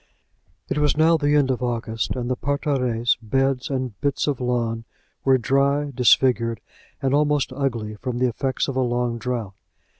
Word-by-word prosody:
It - - -1
was 150 0 +2
now 160 +1 +5
the 145 -2 +2
end 140 -3 +3
of 125 - -2
August, 115 -2 -2
and 125 -1 -3
the 130 - 0
parterres, 125 -4 0
beds, 135 +2 0
and 130 -7 -3
bits 140 -1 0
of 140 -4 -1
lawn 120 -2 -1 0.4
were 135 -1 +4
dry, 140 +4 +1
disfigured, 120 -2 +3 0.4
and 135 0 +1
almost 145 -2 +2
ugly, 120 -6 -2
from 120 +3 -4
the 125 - +2
effects 130 +2 -1
of 135 - -3
a 130 - +1
long 120 -1 -1
drought. 115 -4 -3
130 Hz, 170 wpm, -23 LUFS, 120-140 Hz, 0.4 s, now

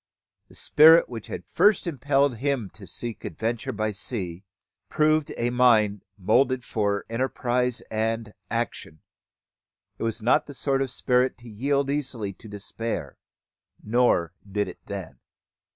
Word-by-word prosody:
The - - -18
spirit 160 +3 +6
which 115 -3 -7
had 85 - -6
first 205 - +3
impelled 140 -4 +1
him 130 -5 -1
to 100 -3 -12
seek 120 -2 -5
adventure 120 +4 -3
by 110 -2 -1
sea, 95 -4 -3 0.5
proved 155 -1 +2
a 120 +1 0
mind 110 -5 +3
moulded 125 +6 +2
for 100 -2 -1
enterprise 125 0 -1
and 110 0 -2 0.2
action. 115 -9 -3 1.0
It - - -4
was 115 0 -1
not 120 +3 +2
the 145 - -9
sort 135 0 0
of 135 - -1
spirit 125 +1 +1
to 120 -1 -15
yield 140 +5 0
easily 125 -8 -3
to 110 - -14
despair; 105 -5 -5 0.6
nor 105 -7 +2 0.2
did 105 0 0
it 90 - -10
then. 95 -5 -7
115 Hz, 135 wpm, -25 LUFS, 105-130 Hz, 1.0 s, spirit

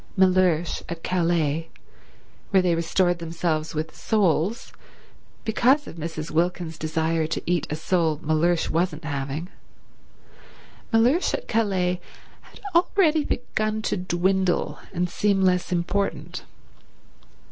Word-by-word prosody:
Mellersh 185 -3 +3
at 165 -1 -6
Calais, 165 -3 0 0.8
where 190 -2 +4
they 180 -2 +3
restored 175 +1 +1
themselves 165 -1 -2
with 155 +1 -3
soles 200 0 0 0.7
because 255 +6 +3
of 170 - -10
Mrs. 160 -1 -5
Wilkins's 165 0 -1
desire 160 0 0
to 160 - -3
eat 175 -3 0
a 150 - -2
sole 160 -1 +1
Mellersh 165 +2 +2
wasn't 165 -1 -1
having—Mellersh 175 - -3
at - - -7
Calais 185 -5 +1 0.4
had - - -17
already 335 -3 +3
begun 215 -5 -2
to - - 0
dwindle 185 0 0
and 180 -1 0
seem 195 +2 +1
less 180 -1 +2
important. 180 +3 -2
175 Hz, 110 wpm, -24 LUFS, 160-195 Hz, 0.8 s, where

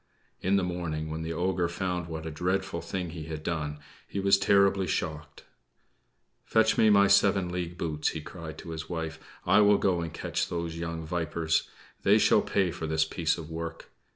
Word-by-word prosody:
In 95 +2 +2
the 100 - +2
morning, 80 -3 -3
when 80 +1 -4
the 80 0 -4
ogre 90 0 0
found 90 -1 -2
what 80 -1 -6
a 80 - -4
dreadful 90 +2 -1
thing 90 0 -4
he 80 -2 -7
had 80 -1 -6
done, 75 -3 -2 0.3
he 100 - -4
was 100 0 +4
terribly 100 -1 +3
shocked. 75 -2 -3 1.0
"Fetch 110 0 +3
me 110 - +5
my 100 -1 +6
seven 100 -2 +4
league 90 -1 -4
boots," 75 -3 -2
he 80 - -4
cried 80 0 -8
to 85 - -8
his 80 -1 -6
wife. 80 -3 -4 0.3
"I 95 +4 +5
will 105 0 +6
go 90 -4 +1
and 85 -1 -4
catch - - -2
those 85 -1 -3
young 85 -1 -4
vipers. 80 -1 -1 0.3
They - - +5
shall - - +5
pay 95 -3 +1
for 80 - -5
this 80 0 +2
piece 80 0 0
of 80 -1 -8
work!" 85 0 -6
85 Hz, 190 wpm, -28 LUFS, 80-95 Hz, 1.0 s, my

